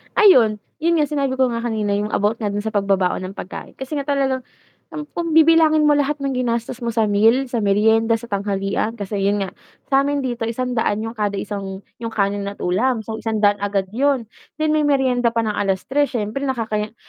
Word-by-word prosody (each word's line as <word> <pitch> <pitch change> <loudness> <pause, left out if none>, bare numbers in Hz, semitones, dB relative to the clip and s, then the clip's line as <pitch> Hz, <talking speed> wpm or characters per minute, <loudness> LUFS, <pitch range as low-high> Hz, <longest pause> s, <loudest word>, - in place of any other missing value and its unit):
Ayun, 245 - +5 0.2
'yun 335 +1 +2
nga 295 - +2
sinabi 280 -3 -1
ko 260 - +4
nga 230 0 -3
kanina 215 -3 -1
yung 210 +1 -2
about 210 +3 +1
nga 205 -1 -1
dun 205 0 -2
sa 220 - -3
pagbabaon 195 -3 +1
ng - - -15
pagkain 185 - -8
kasi 265 +3 -5
nga 280 - -1
talagang, 270 -3 0 0.5
um, 300 - -4
kung 335 -2 -2
bibilangin 320 -1 +5
mo 295 - +5
lahat 290 +1 0
ng 275 -1 -1
ginastos 235 -1 -2
mo 235 - -1
sa 225 -2 +3
meal, 225 +6 +3
sa 235 - -1
merienda, 220 +2 +3
sa 230 0 -5
tanghalian 200 +2 -1
kasi 205 -2 -4
'yun 200 +1 +1
nga, 190 - -4 0.4
sa'min 275 +1 +2
dito 240 -3 -2
100 230 -3 -1
'yon 225 +1 -5
kada 205 -1 -1
isang, 195 -1 -5 0.2
'yong 230 -1 -5
kanin 200 -1 0
at 200 - -7
ulam 220 +6 +1
so 220 0 -6
100 210 -2 +1
agad 195 -1 -2
'yon, 260 0 +1 0.3
then 310 0 +2
may 305 -1 +2
meryenda 250 -4 +2
pa 230 - +1
ng 215 -2 -1
3:00 205 +9 0
siyempre 225 +5 -2
nakakahiya 220 -4 -2
225 Hz, 200 wpm, -20 LUFS, 205-270 Hz, 0.5 s, Ayun